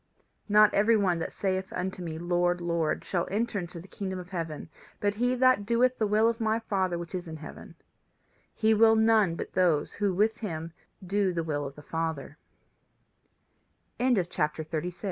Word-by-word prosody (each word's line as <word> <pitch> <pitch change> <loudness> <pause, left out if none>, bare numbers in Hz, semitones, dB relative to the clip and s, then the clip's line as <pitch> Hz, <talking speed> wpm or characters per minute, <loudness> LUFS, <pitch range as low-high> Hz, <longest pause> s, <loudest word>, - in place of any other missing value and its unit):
"Not 210 0 +6
every 220 +2 +4
one 185 -5 +1
that 165 - -4
saith 190 -1 -2
unto 185 0 -4
me, 165 -2 -5
Lord, 175 +1 +1
Lord, 170 -2 -1
shall 175 -2 -1
enter 215 +1 -1
into 175 -1 -7
the 175 - -12
kingdom 190 -2 -5
of 180 0 -8
heaven, 165 -5 -5 0.3
but 205 0 +1
he 245 +4 +1
that 255 -4 +4
doeth 240 +4 +2
the 215 - +2
will 215 +2 +3
of 230 0 -1
my 220 0 +2
Father 190 -5 -1
which 170 +1 -7
is 180 -1 -4
in 160 -1 -7
heaven. 155 - -11 0.8
He 220 0 +3
will 225 +1 +6
none 220 -5 +4
but - - -6
those 170 -5 +2
who 205 -2 0
with 215 +5 +1
him 165 -6 -5 0.3
do 195 0 +1
the 165 -1 -1
will 145 -2 -2
of 140 - -10
the 150 - -12
Father." 160 -2 -4 1.6
CHAPTER 175 -10 0
IV. 155 - -22
NURSING. 180 - -4
185 Hz, 185 wpm, -28 LUFS, 170-215 Hz, 1.6 s, Not